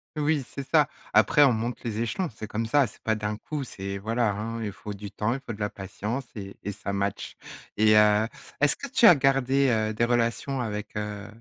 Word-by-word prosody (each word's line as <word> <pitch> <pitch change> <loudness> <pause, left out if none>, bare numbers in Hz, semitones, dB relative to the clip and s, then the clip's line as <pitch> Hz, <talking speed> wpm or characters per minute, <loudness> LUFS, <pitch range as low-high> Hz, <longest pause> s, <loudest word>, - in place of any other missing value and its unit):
Oui, 150 -1 +1
c'est 140 -1 -7
ça, 150 -3 +4 0.3
après 150 - +5
on 135 -3 +5
monte 115 +2 -3
les 110 -2 -3
échelons, 175 - -1
c'est 110 -2 -7
comme 110 +2 -2
ça, 135 +3 +3
c'est - - -17
pas 110 - +1
d'un 105 -1 -3
coup, 145 +5 -5
c'est 100 -5 -6
voilà 115 +2 0
hein? 115 +3 -4
Il 105 - -3
faut 105 +1 -8
du 100 0 -8
temps, 105 +2 -1
il - - -5
faut 115 - -4
de 105 - -11
la 105 0 -1
patience 105 +7 -5
et 100 -2 -8
et 100 - -3
ça 100 0 -5
matche. 100 0 -3 0.4
Et 110 0 +5
heu, 105 +1 +5 0.3
est-ce 145 0 +3
que 280 - -7
tu 240 - +3
as 180 - +11
gardé, 135 0 +2
heu, 110 -2 +1
des 115 +2 +1
relations 120 +3 0
avec, 105 -3 -4
heu, 105 -1 -4
110 Hz, 225 wpm, -26 LUFS, 105-135 Hz, 0.4 s, as